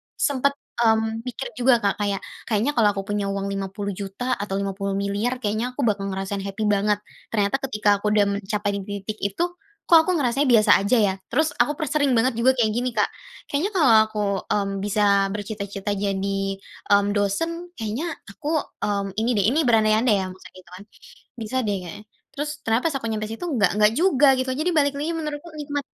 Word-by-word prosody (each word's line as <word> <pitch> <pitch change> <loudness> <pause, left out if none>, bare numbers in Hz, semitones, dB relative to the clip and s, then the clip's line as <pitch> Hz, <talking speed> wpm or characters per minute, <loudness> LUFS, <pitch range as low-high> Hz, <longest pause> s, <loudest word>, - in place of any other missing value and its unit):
sempet, 280 0 +1 0.2
mmm, 225 -1 +2
mikir - - -5
juga, 240 -3 +4
Kak, 200 +1 0
kayak 200 -1 -1 0.2
kayaknya 225 +6 +1
kalau 215 -6 +3
aku 195 - -3
punya 205 0 -2
uang 195 0 -2
Rp.50.000.000 195 +3 -4
atau 205 -1 -3
Rp.50.000.000.000 200 +5 -2
kayaknya 220 +4 -1
aku 280 - -2
bakal 205 -3 0
ngerasain 195 +1 -3
happy 195 +2 -4
banget. 210 0 +1 0.2
Ternyata 210 +4 0
ketika 210 -4 +2
aku 210 - -2
udah 205 -1 +5
mencapai 205 0 -2
di - - -5 0.2
titik 215 +1 -5
itu 200 - -1 0.4
kok 330 -2 +7
aku 365 - +2
ngerasanya 275 -1 +1
biasa 215 -4 +5
aja 200 +5 +2
ya? 205 -3 +3
Terus 315 +1 +1
aku 295 - +3
per 305 -3 -4
sering 285 -4 +2
banget 235 0 +1
juga 260 +2 +4
kayak 225 -4 +2
gini, 245 +1 -2
Kak, 210 - +2 0.4
kayaknya 325 +9 0
kalau 285 -10 +5
aku, 215 -1 -6 0.3
mmm, 200 -1 0
bisa 200 0 +2
bercita-cita 205 -1 -4
jadi, 195 -1 -1 0.5
mmm, 200 0 +4
dosen, 330 - -1
kayaknya 245 +10 -3 0.2
aku, 300 +9 -1 0.2
mmm, 200 -1 -1
ini 225 +2 0
deh 200 - +2
ini 300 - +1
berandai-andai 220 0 +4
ya - - -3
maksudnya 185 - -14
gitu 180 - -18
kan, 190 - -11 0.6
bisa 225 +3 -3
deh 205 -2 0
kayaknya. 180 +4 -9 0.3
Terus 295 +1 -2
ternyata 225 0 0
pas - - -6
aku 230 - -4
nyampe 215 -1 -2
situ 230 +10 -5
nggak 205 -5 +3
nggak 210 0 +5
juga 315 -6 +4
gitu 260 0 -2
lho. 255 - -3
Jadi 360 - +3
balik 285 -2 +3
lagi 315 +3 -1
menurutku 305 +1 -5
nikmat, 290 -2 -4
215 Hz, 190 wpm, -23 LUFS, 200-260 Hz, 0.6 s, kok